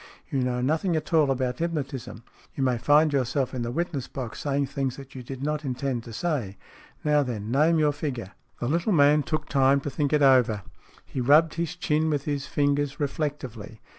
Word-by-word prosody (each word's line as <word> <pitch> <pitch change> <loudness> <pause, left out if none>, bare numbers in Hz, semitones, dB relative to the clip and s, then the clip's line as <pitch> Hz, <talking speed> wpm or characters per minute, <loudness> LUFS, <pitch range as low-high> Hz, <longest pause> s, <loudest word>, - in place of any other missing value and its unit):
You 135 - 0
know 125 -1 -1
nothing 160 +6 +1
at 155 +2 -3
all 155 -3 +4
about 130 -2 -1
hypnotism. 140 -9 -4 0.3
You 135 - -1
may 125 -3 +1
find 150 +4 +4
yourself 135 0 0
in 125 - -3
the 120 - -2
witness 155 -2 -2
box 125 -5 -6
saying 140 -1 0
things 135 -2 -3
that 135 -1 -11
you 130 - -7
did 130 +2 -7
not 150 +1 -1
intend 130 -2 -2
to 115 - -9
say. 115 - -2 0.5
Now, 150 -1 +3
then, 115 -5 -4
name 155 +5 +4
your 150 -1 +3
figure." 145 -5 -4
SMEATH 95 - -19
21 120 - -1
The - - +3
little 185 +5 0
man 150 -1 +5
took 155 0 -3
time 135 0 +3
to 145 - -4
think 145 -1 -1
it 150 -1 +3
over. 125 -6 +4 0.4
He 130 - -4
rubbed 150 +5 +5
his 170 +1 -3
chin 160 -3 0
with 145 -2 -1
his 140 -2 -2
fingers 145 -1 0
reflectively. 135 -7 -4
140 Hz, 205 wpm, -26 LUFS, 125-150 Hz, 0.5 s, man